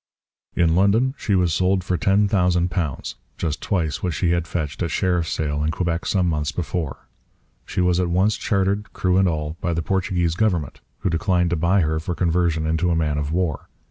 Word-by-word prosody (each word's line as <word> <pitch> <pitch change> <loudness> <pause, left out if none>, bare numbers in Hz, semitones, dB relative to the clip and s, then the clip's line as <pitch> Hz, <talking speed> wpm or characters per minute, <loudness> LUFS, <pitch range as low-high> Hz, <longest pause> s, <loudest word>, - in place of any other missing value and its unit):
In 85 -2 +3
London 105 +8 +3
she 105 - -1
was 90 -3 +2
sold 95 +2 +1
for 90 0 -1
£10,000, 90 - +1 0.2
just 75 -3 -2
twice 80 -7 -1
what 90 -3 -2
she 85 -2 +1
had 85 -1 0
fetched 75 -3 -4
at 85 - 0
sheriff's 90 -1 0
sale 75 -1 -1
in 75 - +1
Quebec 85 0 -2
some 95 -3 +1
months 75 -3 -1
before. 80 -3 -4 0.6
She - - -1
was 90 0 +2
at 90 -1 0
once 95 +5 +2
chartered, 100 +1 -1
crew 90 0 +1
and 95 0 +4
all, 75 0 -3
by 85 -2 -1
the 85 - -1
Portuguese 90 -2 0
government, 90 -7 -1 0.2
who 95 - 0
declined 90 +1 +1
to - - +2
buy 85 +4 +2
her 80 -1 0
for 85 +2 -4
conversion 85 -2 +1
into 80 +3 +1
a 85 - +2
man 75 -2 0
of 75 0 -3
war. 85 -5 -2
85 Hz, 195 wpm, -22 LUFS, 80-95 Hz, 0.6 s, and